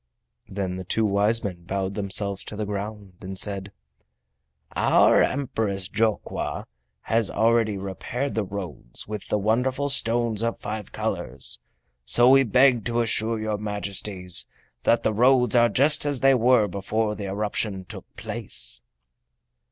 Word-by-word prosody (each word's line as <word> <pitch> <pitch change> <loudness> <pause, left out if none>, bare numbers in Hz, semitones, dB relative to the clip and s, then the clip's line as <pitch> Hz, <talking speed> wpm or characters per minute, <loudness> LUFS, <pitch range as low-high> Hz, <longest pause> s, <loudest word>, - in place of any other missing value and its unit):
Then 95 -2 -3
the 95 0 -6
two 110 +4 0
wise 105 +3 +1
men 90 -4 -5
bowed 95 +1 -3
themselves 100 -1 -1
to - - -7
the 105 0 -3
ground 100 -1 -6
and 95 0 -7
said: 100 0 -1 1.0
"Our - - +4
Empress 110 -8 -1
Jokwa 110 +1 -2 0.4
has 115 -2 +1
already 115 -2 +1
repaired 100 +8 -4
the 110 - 0
roads 90 -11 -7
with 105 -3 -6
the - - 0
wonderful 125 +7 0
stones 115 -4 +3
of 115 0 -1
five 105 -1 -6
colors, 65 -1 -2 0.4
so 120 - +5
we 135 0 +7
beg 125 -1 +3
to 120 0 0
assure 115 0 0
your 110 -1 -3
Majesties 100 -3 +1 0.4
that 115 - +3
the 110 - +1
roads 125 +2 +3
are 120 0 +5
just 145 +7 +4
as 145 -3 0
they 135 0 +5
were 125 -3 +3
before 105 +3 -2
the 105 -1 -6
eruption 100 -1 -3
took - - -9
place." - - -2
105 Hz, 145 wpm, -24 LUFS, 100-115 Hz, 1.0 s, we